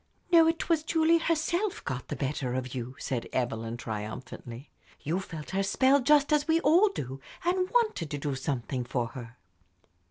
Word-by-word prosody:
"No, 330 -2 +7
it 330 0 0
was 330 -3 +3
Julie 325 +1 +3
herself 340 +5 0
got 130 -1 -4
the - - -4
better 135 -3 -2
of 130 -1 -3
you," 125 0 -5
said 130 -5 -3
Evelyn, 115 -2 -2
triumphantly. 115 +3 -7 0.3
"You 165 +6 -1
felt 165 -5 -8
her 195 +1 +1
spell, 260 +8 +4
just 295 +2 +4
as 300 0 +2
we 325 0 +4
all 345 +8 +5
do, 135 - -6 0.3
and 365 +1 +1
wanted 445 - +1
to 145 - -3
do 145 0 -2
something 130 -1 -2
for 120 -1 -2
her." 120 -1 -10
150 Hz, 170 wpm, -29 LUFS, -, 0.3 s, No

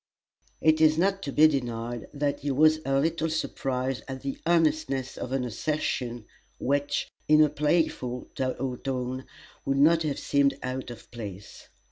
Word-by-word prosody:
It 155 0 +4
is 155 0 +5
not 195 +3 +2
to 145 - -4
be 155 +3 +7
denied 120 -5 -3
that 145 0 -1
he 145 - -3
was 155 +3 +4
a 135 0 +2
little 160 +2 0
surprised 135 -4 -2
at 130 0 -6
the 135 -1 -4
earnestness 155 -6 +1
of 125 - -6
an 135 -1 0
assertion 120 -2 -2 0.3
which, 145 +1 0 0.2
in 155 0 +6
a 155 -1 +6
playful 150 -5 0
tone, 130 0 -3 0.4
would 135 0 0
not 160 +4 +5
have 150 -3 -1
seemed 140 -1 +2
out 130 0 -4
of 120 -2 -11
place. 100 -5 -9
135 Hz, 150 wpm, -27 LUFS, 125-155 Hz, 0.4 s, be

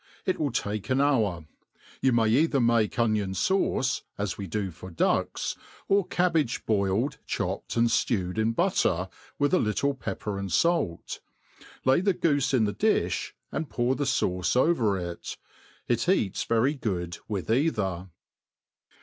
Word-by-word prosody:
It 185 - 0
will 145 -3 0
take 105 -2 -3
an 130 +1 +2
hour. 110 - +1 0.6
You 130 - +3
may 115 -2 +3
either 140 +4 +3
make 115 -2 +2
onion 110 -5 +1
fauce, 190 - +1 0.2
as 100 -2 -2
we 100 - -6
do 95 +1 -2
for 90 +3 -10
ducks, 80 - 0 0.3
or 195 -2 +2
cabbage 165 -9 0
boiled, 105 +6 0
chopped, - - -3
and 115 0 +4
ftewed 105 -4 0
in 110 +1 +1
butter, 95 - +1 0.3
with 145 +4 +1
a 185 - +5
little 130 +6 +1
pepper 105 -5 -4
and 100 -2 -4
fait; 165 - 0 0.7
lay 130 +6 +4
the 195 0 +2
goofe 145 -6 +1
in 130 -4 +3
the 105 -1 0
difb, - - 0 0.2
and 155 - -3
pour 120 +1 +1
the 140 +2 -2
fauoe 90 0 0
overJt. 100 - 0 0.5
It 120 +7 +1
eats 110 - +1
very 115 +5 +2
good 90 - -3
with 105 -1 -3
either. 105 - 0
115 Hz, 150 wpm, -27 LUFS, 100-140 Hz, 0.7 s, a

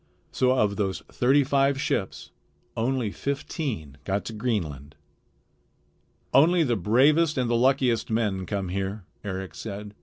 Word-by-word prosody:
So 130 0 +2
of 105 -4 +1
those 95 -3 -1
thirty 135 +3 +3
five 140 0 +2
ships 95 -7 -2 0.4
only 120 -2 0
fifteen 135 - -4
got 100 +5 -2
to 115 - -5
Greenland. 85 - -3 1.4
"Only 165 +6 +5
the 120 -5 +1
bravest 140 - +3
and 125 -2 +1
the 120 - +1
luckiest 125 -1 +2
men 105 -5 -1
come 100 -3 -2
here," 95 +1 -3 0.2
Eric 95 -2 -5
said. 105 -1 -7
115 Hz, 130 wpm, -26 LUFS, 100-135 Hz, 1.4 s, Only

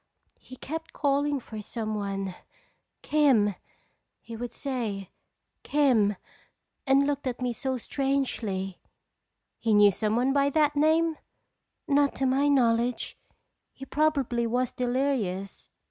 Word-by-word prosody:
He 255 - -12
kept 320 +5 -6
calling 285 0 +1
for 220 -3 -8
some 215 0 -4
one. 195 -2 -3 0.7
'Kim' 265 -9 +3 0.7
he 230 - -9
would 240 +1 -5
say, 225 -9 -4 0.5
'Kim' 245 -9 +2 0.7
and 270 +1 +4
looked 285 -1 -2
at 245 -1 -3
me 250 -1 -1
so 260 +3 -2
strangely." 235 -9 -2 0.8
"He 220 -2 +2
knew 205 -1 +7
some 215 +3 -1
one 255 +3 +2
by 280 0 +3
that 300 0 +2
name?" 315 +2 +3 0.7
"Not 285 -1 +3
to 270 - -1
my 270 +2 +2
knowledge. 245 -3 +1 0.6
He 270 - -10
probably 275 -6 +1
was 250 +1 0
delirious." 245 -7 -2
255 Hz, 120 wpm, -27 LUFS, 220-280 Hz, 0.8 s, knew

